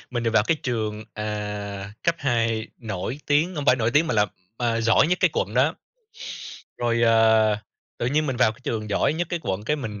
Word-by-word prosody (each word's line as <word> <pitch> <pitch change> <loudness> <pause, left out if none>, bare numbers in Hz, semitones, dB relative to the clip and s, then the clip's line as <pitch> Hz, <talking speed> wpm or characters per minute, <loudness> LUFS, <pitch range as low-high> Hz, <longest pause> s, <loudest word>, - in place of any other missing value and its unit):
mình 120 -2 -2
được 115 - +1
vào 110 -1 +4
cái 165 - +2
trường, 110 -3 -2
ờ, 105 - -4 0.8
cấp 170 - +2
2 115 -5 0
nổi 110 +3 -4
tiếng 155 +5 +2
không 145 -2 -3
phải 130 - +6
nổi 115 -1 +1
tiếng 150 +4 +3
mà 160 - -1
là, 105 -1 +4 0.3
à, 115 -2 0
giỏi 115 +5 +4
nhất 180 +2 0
cái 185 -4 +4
quận 105 -3 -2
đó. 135 +5 +3 1.0
Rồi, 120 -1 +1
à, 110 -2 +4 0.4
tự - - -1
nhiên 150 +4 +1
mình 130 -3 -2
vào 120 -3 +4
cái 110 - -20
trường 110 -2 -3
giỏi 120 - +2
nhất 170 +1 -2
cái 175 -2 -2
quận 95 +2 -3
cái 150 +7 +1
mình 105 -7 -6
115 Hz, 215 wpm, -24 LUFS, 110-145 Hz, 1.0 s, phải